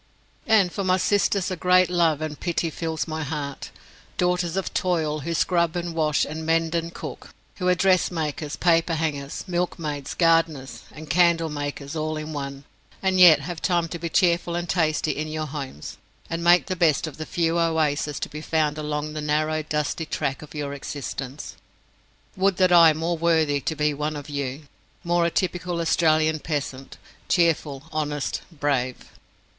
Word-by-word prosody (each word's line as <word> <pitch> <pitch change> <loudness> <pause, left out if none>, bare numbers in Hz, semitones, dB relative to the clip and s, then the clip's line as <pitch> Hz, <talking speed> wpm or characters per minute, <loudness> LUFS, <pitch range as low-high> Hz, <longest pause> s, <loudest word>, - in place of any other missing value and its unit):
And 205 -5 +4
for 200 - -3
my 185 0 +3
sisters 200 -1 +1
a - - -1
great 180 +1 +4
love 165 -4 +2
and 155 -1 -4
pity 170 -1 -1
fills 160 0 -3
my 160 0 -3
heart. 145 -2 -5 0.5
Daughters 180 0 0
of 195 - -2
toil, 160 -4 0
who 165 +4 -3
scrub 170 -1 +1
and 175 -1 -3
wash 155 -3 +1
and 160 +1 -6
mend 165 0 +1
and 170 0 -1
cook, - - -8 0.3
who 180 - -2
are 180 - +4
dressmakers, 160 -5 0
paperhangers, 160 -4 0
milkmaids, 165 -5 -3
gardeners, 155 -8 +1
and 155 0 -10
candle 165 +1 +3
makers 145 0 -5
all 155 0 -2
in 155 0 -5
one, 140 -1 -5 0.4
and 190 -1 +2
yet 170 -5 +8
have 165 +3 -6
time 175 -2 +1
to 170 - -5
be 170 0 -3
cheerful 170 0 +2
and 175 0 -2
tasty 155 -3 +1
in 155 +2 -3
your 155 0 -3
homes, 135 - -7 0.3
and 165 0 -2
make 175 +1 +5
the 185 - -2
best 165 -5 +2
of 155 - -8
the 155 - -5
few 170 0 0
oases 150 -3 0
to - - -2
be 150 - -8
found 155 -1 0
along 150 0 -3
the 155 - -4
narrow 155 +1 0
dusty 150 +1 -2
track 135 -2 -2
of 150 0 -12
your 145 -1 -3
existence. 140 -1 -6 0.8
Would 190 -1 +2
that 185 -1 +4
I 170 -2 +8
were - - -7
more 165 +1 -1
worthy 160 -4 +2
to 160 - -2
be 150 0 +1
one 150 +2 -3
of 145 0 -7
you 140 0 -3 0.4
more 170 0 +2
a - - +1
typical 175 0 -2
Australian 160 -1 +2
peasant 140 -4 -4 0.3
cheerful, 160 -5 +1
honest, 145 -2 -2
brave! 140 -5 -1
160 Hz, 170 wpm, -24 LUFS, 150-170 Hz, 0.8 s, yet